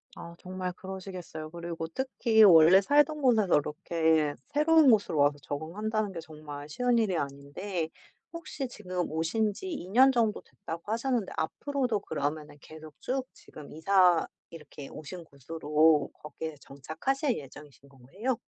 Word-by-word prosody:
아 170 0 -10
정말 185 0 -5
그러시겠어요. 185 -4 -8
그리고 170 -1 -5
특히 230 +1 +2
원래 175 0 +8
살던 295 +6 +2
곳에서 220 -8 +3
이렇게 155 0 0
새로운 305 -1 +4
곳으로 205 -8 +3
와서 145 0 +3
적응한다는 200 - -3
게 165 - -6
정말 150 -2 -10
쉬운 245 +8 +1
일이 205 -7 +1
아닌데 145 +6 -4 0.4
혹시 315 -5 -6
지금 185 -6 -4
오신 185 +7 0
지 380 - -8
2 285 - -6
년 260 +6 +6
정도 230 -4 +1
됐다고 170 +1 -8
하셨는데 235 -2 -1
앞으로도 250 - -2
그러면은 150 -1 -4
계속 155 -1 -12
쭉 260 0 -2
지금 150 -2 -13
이사 180 +1 +4 0.3
이렇게 150 -3 -10
오신 170 +3 -9
곳으로 150 +1 +1
거기에 155 +1 -8
정착하실 240 - -2
예정이신 140 0 -13
건가요? 185 - -4
175 Hz, 325 characters per minute, -29 LUFS, 155-225 Hz, 0.4 s, 원래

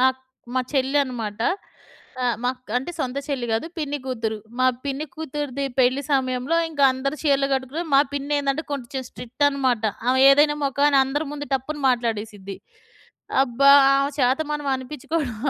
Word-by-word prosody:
అక్ 260 0 0 0.3
మా 255 - +2
చెల్లి 270 +1 +1
అనమాట. 225 -4 -5 0.8
ఆహ్, 240 -3 +1
మాక్ 250 -2 -3
అంటే 265 +7 -2
సొంత 265 -1 -2
చెల్లి 265 -5 -2
గాదు 225 +8 0
పిన్ని 290 -1 -2
కూతురు. 225 -4 -2 0.2
మా 255 - +4 0.2
పిన్ని 280 +2 -3
కూతురిది 290 -3 -4 0.2
పెళ్లి 255 +3 +3
సమయంలో, 260 +3 +1
ఇంకందరూ 275 -2 +1
చీరలు 280 -2 +2
గట్టుకున్నారు. 280 +6 -3
మా - - +7
పిన్నేందంటే 285 +1 -1
కొంచెం 265 -1 -4
స్ట్రిక్టన్నమాట. 260 -2 0 0.2
ఆమె 260 +1 +3
ఏదైనా 295 +1 +4
మొఖాన 280 +1 +2
అందరి 290 +3 -2
ముందు 290 0 -6
టప్పున 295 +4 -3
మాట్లాడేసిద్ది. 215 -5 -2 0.9
అబ్బా! 275 +2 +4 0.3
ఆమె 275 +1 +1
చేత 260 +3 +2
మనం 295 -1 -3
అనిపించుకోవడం 260 -1 -4
270 Hz, 140 wpm, -23 LUFS, 250-285 Hz, 0.9 s, మా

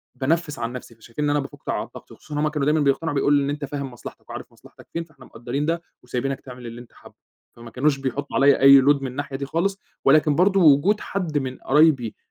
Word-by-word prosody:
بانفِّس 150 0 -1
عن 115 +1 -3
نَفْسي، 120 -2 -9
فشايفين 115 +6 -7
إن - - +1
أنا 145 0 +2
بافُك 135 - -8
على - - -1
الضغط، - - -14
وخصوصًا 150 -1 -7
هُم 155 - +1
كانوا 150 -2 -2
دايمًا 155 +2 +2
بيقتنعوا 145 +2 0
بيقولوا: 145 +1 +3
"إن 140 - -2
أنت 145 0 -3
فاهم 140 -1 -5
مصلحتك، 120 - -12
وعارف - - -8
مصلحتك - - -18
فين 170 - -2
فاحنا 155 -4 -18
مقدّرين 140 +8 -3 0.3
وسايبينك 130 +2 -3
تعمل 125 -2 -11
اللي 115 +1 -8
أنت 120 - -17
حابّه."، - - -17 0.4
فما 120 0 -11
كانوش 140 +2 +1
بيحطّوا 135 +1 -4
عليَّ 140 0 +5
أي 135 0 +8
load 140 +1 +3
من 135 - -3
الناحية 135 +1 -5
دي 140 +1 -4
خالص، 185 +7 -1 0.3
ولكن 150 +1 +4
برضه 190 +3 +3
وجود 160 +7 +5
حد 175 -6 -3
من 130 -2 -3
قرايبي 140 -5 +2
140 Hz, 220 wpm, -23 LUFS, 130-150 Hz, 0.4 s, أي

